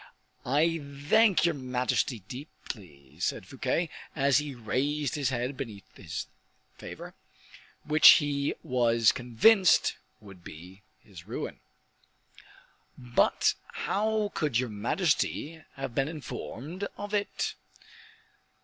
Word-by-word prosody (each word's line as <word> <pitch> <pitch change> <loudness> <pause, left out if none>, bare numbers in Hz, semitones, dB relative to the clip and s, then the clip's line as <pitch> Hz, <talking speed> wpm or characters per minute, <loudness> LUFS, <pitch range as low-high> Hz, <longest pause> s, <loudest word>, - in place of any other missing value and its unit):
"I 160 +5 +2 0.3
thank 220 -5 +5
your 170 - +3
majesty 125 -3 -1
deeply," 85 - -10
said 95 - -2
Fouquet, 135 - -1 0.3
as 140 -1 +3
he 145 -2 -5
raised 140 +5 -1
his 145 -4 0
head 125 +1 -2
beneath 110 -7 -7
this - - -6 0.5
favor, - - -9 0.7
which 155 0 +8
he 145 -1 0
was 115 -3 +3
convinced 165 - +4 0.2
would 100 -4 -14
be 90 +6 -12 0.2
his 90 -4 -13
ruin. - - -5 1.4
"But 120 -2 +2 0.2
how 215 0 0
could 150 -7 0
your 125 -1 0
majesty 150 - -1
have 135 -3 -5
been 135 +2 +1
informed 155 - -6
of 205 +1 -6
it?" 205 -1 -1
135 Hz, 105 wpm, -29 LUFS, 115-160 Hz, 1.4 s, which